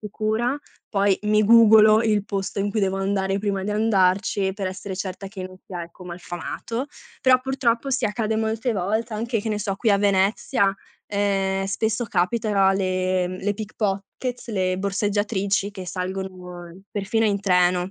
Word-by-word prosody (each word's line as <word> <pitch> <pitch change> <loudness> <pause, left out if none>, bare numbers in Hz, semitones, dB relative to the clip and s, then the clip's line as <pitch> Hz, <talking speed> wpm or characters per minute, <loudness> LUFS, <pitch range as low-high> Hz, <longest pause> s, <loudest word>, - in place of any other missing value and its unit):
sicura. 220 +5 -1 0.3
Poi 200 -1 +2
mi 210 0 +3
googlo 220 -1 +7
il 210 -3 +1
posto 195 -1 -3
in 200 - 0
cui 215 - -1
devo 195 0 +1
andare 195 0 0
prima 200 -2 -1
di 210 - -3
andarci 200 -1 +2
e - - -2
per 195 -2 -3
essere 190 0 -5
certa 195 0 -5
che 190 -2 -7
non 185 0 -13
sia, 180 -2 -5
ecco, 170 +2 -14
malfamato. 175 +8 -5 0.3
Però 255 -1 +5
purtroppo 265 -1 0
sì, 255 -3 +1
accade 215 +1 -1
molte 220 +2 -1
volte 220 +4 -1
anche, 230 +1 -1
che 220 - -4
ne 210 - -1
so, 195 -1 -2
qui 220 +1 +1
a 200 - +4
Venezia: 200 +2 +2 0.3
ehm, 195 -1 0
spesso 220 +4 -1
capita 200 0 +2
le 185 -1 0
le 205 +1 0
pickpockets, 215 +4 -4
le 185 -4 0
borseggiatrici 200 0 0
che 190 -3 -8
salgono 180 -1 -6
perfino 210 +2 0
in 200 -1 +1
treno. 180 -1 +2
200 Hz, 160 wpm, -23 LUFS, 190-220 Hz, 0.3 s, googlo